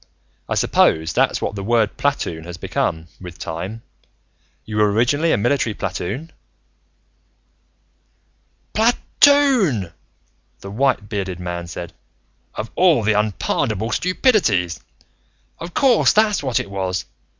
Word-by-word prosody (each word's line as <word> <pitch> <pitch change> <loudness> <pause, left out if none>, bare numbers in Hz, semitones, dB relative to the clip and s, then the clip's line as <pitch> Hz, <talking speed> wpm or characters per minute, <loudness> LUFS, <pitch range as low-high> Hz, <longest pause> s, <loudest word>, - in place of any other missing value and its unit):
I - - 0
suppose 80 +1 +2
that's - - +1
what - - -2
the 100 -1 -5
word 115 0 +1
platoon 115 - -2
has 85 0 -8
become, 80 0 -2
with 90 -3 -10
time. 95 +8 -6 0.8
You 110 -1 -5
were, 105 -1 +3
originally, 145 +9 +2
a - - +3
military 120 -1 0
platoon?" 130 - -4 2.4
"Pla 225 +3 +4 0.3
toon!" 240 - +4 0.7
the 100 - -8
white 130 -2 0
bearded 95 -4 -4
man 85 -1 -5
said. 85 0 -7 0.6
"Of 110 +1 -5
all 170 -10 +4
the 110 +1 +2
unpardonable 105 +2 -1
stupidities! 120 - +1 0.8
Of 170 +1 -8
course 260 -5 +4
that's 215 -1 +3
what 130 -5 0
it 100 - -6
was. 95 -1 -2
110 Hz, 120 wpm, -20 LUFS, 90-145 Hz, 2.4 s, Pla